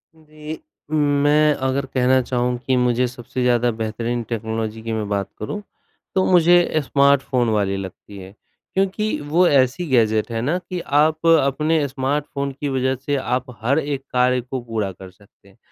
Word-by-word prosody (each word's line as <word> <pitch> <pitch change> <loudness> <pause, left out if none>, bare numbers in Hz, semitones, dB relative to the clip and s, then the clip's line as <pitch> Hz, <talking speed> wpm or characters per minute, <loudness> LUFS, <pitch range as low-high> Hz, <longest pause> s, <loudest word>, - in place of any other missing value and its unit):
जी, 155 0 -10 0.3
मैं 150 0 +3
अगर 135 0 -1
कहना 130 0 +2
चाहूँ 125 0 -1
कि 130 - +2
मुझे 125 0 +2
सबसे 125 +1 -6
ज़्यादा 120 -1 +2
बेहतरीन 115 +2 -2
टेक्नोलॉजी 110 -1 -3
की 115 - -5
मैं 110 -2 -2
बात 100 -1 -2
करूँ 205 - -4 0.5
तो 190 - +3
मुझे 175 0 +5
स्मार्टफ़ोन 135 -3 +2
वाली 100 -2 0
लगती 95 +1 -9
है 95 0 -10 0.4
क्योंकि 195 +3 0
वो 165 +5 +3
ऐसी 140 +5 +2
गैजेट 110 -3 +2
है 115 - -2
ना 150 +9 0
कि 180 0 -6 0.2
आप 155 +2 +2
अपने 150 0 +3
स्मार्टफ़ोन 140 +1 -2
की 145 - -1
वजह 130 0 0
से 140 +3 -3
आप 130 -2 -1 0.2
हर 140 +7 +2
एक 140 -2 -3
कार्य 125 0 +2
को 125 +1 -5
पूरा 110 -4 -3
कर 95 0 -12
सकते 100 +2 -25
हैं। - - -24
130 Hz, 165 wpm, -21 LUFS, 115-150 Hz, 0.5 s, मुझे